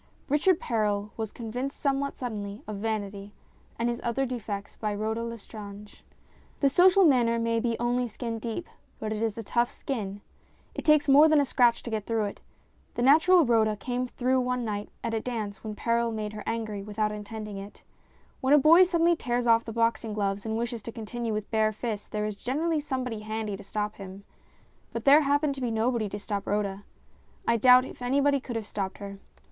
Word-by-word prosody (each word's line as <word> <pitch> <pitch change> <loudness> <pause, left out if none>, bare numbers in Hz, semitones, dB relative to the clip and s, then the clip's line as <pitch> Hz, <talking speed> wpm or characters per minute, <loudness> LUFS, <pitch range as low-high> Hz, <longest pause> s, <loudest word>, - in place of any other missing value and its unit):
Richard 315 +5 +3
Perral 210 -2 -1
was 220 -2 -4
convinced 245 +4 -5
somewhat 280 0 -1
suddenly 210 -4 -5
of 215 -1 -5
vanity 205 -1 -4 0.4
and 235 - 0
his 240 0 -2
other 240 +3 0
defects 215 -5 -5
by 210 -2 -2
Rhoda 220 +2 -2
Lestrange. 210 -3 -9 0.6
The 280 - +4
social 370 +6 +6
manner 240 -6 +4
may 230 0 +1
be 235 0 -1
only 245 +1 0
skin 230 0 -5
deep, 230 +8 -4 0.3
but 215 0 -3
it 215 - -4
is 225 -2 -1
a 230 - -4
tough 235 +3 +1
skin. 205 -7 -5 0.5
It - - -6
takes 305 -1 +5
more 290 +3 +7
than 310 -1 +5
a 285 - +3
scratch 240 -2 +3
to 235 - -6
get 215 -2 -3
through 225 -2 +1
it. 200 - -7 0.5
The 240 - -1
natural 320 +5 +6
Rhoda 220 -3 +3
came 250 +4 -3
through 255 +1 +1
one 250 -1 -1
night 205 -1 -3
at 230 -1 -2
a 225 - +1
dance 220 -4 -5
when 215 -1 -5
Perral 235 +1 0
made 215 -1 -4
her 210 - -6
angry 220 -3 -3
without 210 +1 -1
intending 210 0 -6
it. 200 +1 -10 0.6
When 265 +3 +4
a - - +7
boy 315 +5 +7
suddenly 340 -1 +3
tears 245 -5 -1
off 230 -1 +4
the 225 - -5
boxing 230 -1 0
gloves 200 0 -1
and 220 0 -1
wishes 235 0 -3
to 230 - -7
continue 230 +1 -4
with 215 -1 -4
bare 220 -1 +2
fists, 215 -1 -4
there 210 0 -2
is 210 -1 -3
generally 310 +8 -1
somebody 255 -6 -3
handy 215 -1 -4
to 200 - -10
stop 210 +1 -3
him. 195 0 -9 0.7
But 230 - -5
there 285 +3 +8
happened 285 0 +2
to 270 - -8
be 245 - 0
nobody 225 -1 0
to 205 - -5
stop 205 -1 -4
Rhoda 200 -1 -1 0.6
I 230 - +3
doubt 250 +2 +7
if - - -11
anybody 280 +3 +2
could 250 -2 -7
have 225 -2 -3
stopped 195 -2 -4
her. 200 -1 -8
230 Hz, 200 wpm, -27 LUFS, 210-255 Hz, 0.7 s, there